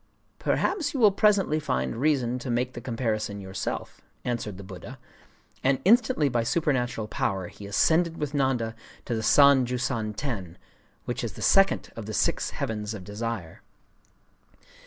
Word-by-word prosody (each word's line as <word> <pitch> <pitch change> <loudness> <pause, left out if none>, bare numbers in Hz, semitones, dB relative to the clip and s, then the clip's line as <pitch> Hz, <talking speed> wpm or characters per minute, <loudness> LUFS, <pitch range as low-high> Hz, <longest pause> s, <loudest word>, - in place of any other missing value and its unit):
'Perhaps 310 -7 0
you - - -1
will 215 -4 +7
presently 195 -6 +3
find 65 - -2
reason 130 -3 +1
to 125 - -6
make 125 +1 0
the 120 - -7
comparison 110 -4 -2
yourself,' 95 -1 -5 0.2
answered 115 -5 -3
the 100 - -9
Buddha;—and 130 +6 -5
instantly 225 - +4
by 120 -3 +1
supernatural 120 -4 0
power 95 -3 -2
he 100 - -10
ascended 165 - +2
with 150 -1 -3
Nanda 130 -5 0 0.3
to - - -2
the 110 - -1
San 140 +3 +6
Jūsan 120 -3 -2
Ten, 100 - -4 0.5
which - - -3
is - - -3
the - - -7
Second 195 0 +4
of 115 -2 -7
the 110 - -4
Six - - +1
Heavens 105 0 -3
of 100 - -8
Desire. 105 -4 -5
120 Hz, 150 wpm, -27 LUFS, 105-145 Hz, 0.5 s, will